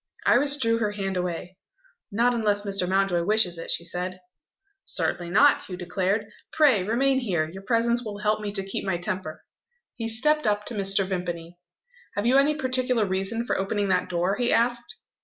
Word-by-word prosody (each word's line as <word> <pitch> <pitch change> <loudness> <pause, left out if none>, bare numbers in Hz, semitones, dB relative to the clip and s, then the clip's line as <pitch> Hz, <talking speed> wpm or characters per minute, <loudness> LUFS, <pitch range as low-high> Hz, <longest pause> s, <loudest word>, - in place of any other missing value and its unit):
Iris 280 +3 +4
drew 230 -4 +1
her 210 -2 -1
hand 195 -2 -3
away. 180 0 -4 0.5
"Not 235 +4 +2
unless 210 -3 0
Mr. 195 -3 -2
Mountjoy 190 -2 +2
wishes 190 -3 +1
it," - - -7
she 170 - -1
said. 180 +2 -4 0.6
"Certainly 175 -1 -1
not!" 280 +11 +5
Hugh 180 - -7
declared. 190 +3 -1 0.3
"Pray 290 -10 +4
remain 260 +7 +2
here; 175 -11 -1
your 190 +5 -9
presence 235 +3 +1
will 210 -3 -6
help 210 +1 0
me 205 -1 -3
to 195 -2 0
keep 195 - -3
my 190 -3 -1
temper." 175 -3 -4 0.5
He 230 -2 -4
stepped 300 +5 +1
up 210 0 +1
to - - -5
Mr. 195 -2 +1
Vimpany. 175 -2 -5 0.6
"Have 205 - -1
you 255 +3 +4
any 295 +2 +3
particular 255 -4 +1
reason 195 +5 -2
for - - 0
opening 200 +1 -1
that 185 -1 +1
door?" 180 +3 0
he 245 -1 +1
asked. 240 0 +1
205 Hz, 180 wpm, -25 LUFS, 185-235 Hz, 0.6 s, not